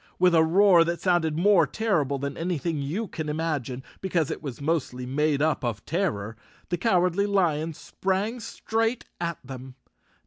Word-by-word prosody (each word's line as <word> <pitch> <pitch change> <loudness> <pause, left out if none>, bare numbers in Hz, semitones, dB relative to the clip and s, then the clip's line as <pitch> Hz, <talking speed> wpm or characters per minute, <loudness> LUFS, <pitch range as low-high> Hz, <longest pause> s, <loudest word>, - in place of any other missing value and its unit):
With 180 -1 +4
a 160 -1 +6
roar 180 +1 +6
that 170 0 -2
sounded 170 -4 +1
more 180 -3 +5
terrible 155 -12 0
than 140 +1 -3
any¬ 170 0 -2
thing 160 -1 -2
you 180 +11 -2
could 155 -4 -5
imagine, 150 -5 -2 0.2
because 175 -5 0
it - - -5
was 135 -6 -6
mostly 140 -4 -1
made 145 +2 +1
up 155 -4 +1
of 115 -4 -3
terror, 140 - -1 0.3
the 175 - 0
Cowardly 185 -1 +2
Lion 165 -5 +1
sprang 195 +9 -2
straight 225 +1 -2
at 170 -1 -2
them. 130 0 -9
165 Hz, 165 wpm, -26 LUFS, 140-185 Hz, 0.3 s, a